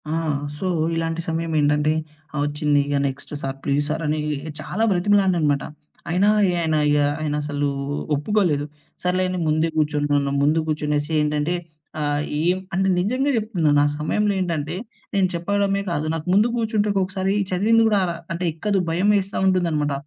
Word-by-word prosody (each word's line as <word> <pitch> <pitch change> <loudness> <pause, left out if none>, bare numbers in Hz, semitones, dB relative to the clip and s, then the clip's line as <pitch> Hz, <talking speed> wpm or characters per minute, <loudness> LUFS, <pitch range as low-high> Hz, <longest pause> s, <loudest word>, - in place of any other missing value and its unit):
ఆ! - - -2 0.5
సో, 190 - -4 0.3
ఇలాంటి 165 0 -1
సమయం 165 0 -2
ఏంటంటే, 150 +1 +2 0.4
ఆ! - - -7
ఒచ్చింది. 145 0 +1
ఇగ 145 0 -1
నెక్స్ట్ 135 +2 -7
సార్, 135 0 -4
ప్లీజ్ 145 +1 +1
సార్, 155 +2 -2
అని 150 +1 0 0.4
చాలా 180 +8 -2
బ్రతిమిలాడిననమాట. 180 -6 +2 0.5
అయినా 185 +4 +3 0.2
ఇగ 180 - +1
ఆయన, 160 -1 +1
ఇగ 145 - +3 0.2
ఆయన 150 -1 -1
అసలు 145 -1 -1 0.5
ఒప్పుకోలేదు. 150 -2 +1 0.4
సర్లే 180 +1 +1
అని 185 0 -2
ముందే 155 +2 +2
గూర్చో‌నున్నాను. 145 -2 +1
ముందు 155 +2 +2
గూర్చునేసి 150 0 -1
ఏంటంటే 150 +3 0 0.4
ఆహ్, 145 -1 0 0.2
ఏం 175 +3 +2 0.2
అంటే 190 +1 +1
నిజంగా 255 +10 +1
జెప్తున్నాను. 175 -10 +2
ఆ - - +3
సమయంలో 205 +7 +1
ఏంటంటే 165 -3 -2 0.4
నేను 195 -2 +3
చెప్పడమే 200 +3 0
కాదు. 155 -2 -1
నాకు 160 0 -4
ముందు 210 +4 +5
గూర్చుంటే 220 -2 0
ఒక్కొక్కసారి 190 0 0 0.2
చదివింది 220 +5 +3
గూడా 210 -2 +3 0.3
అంటే 170 +2 -4
ఎక్కదు. 195 +5 0
భయం 180 +5 +2
ఎస్తా 195 +1 -5
ఉంటుందనమాట. 165 -6 +1
165 Hz, 150 wpm, -22 LUFS, 150-190 Hz, 0.5 s, ముందు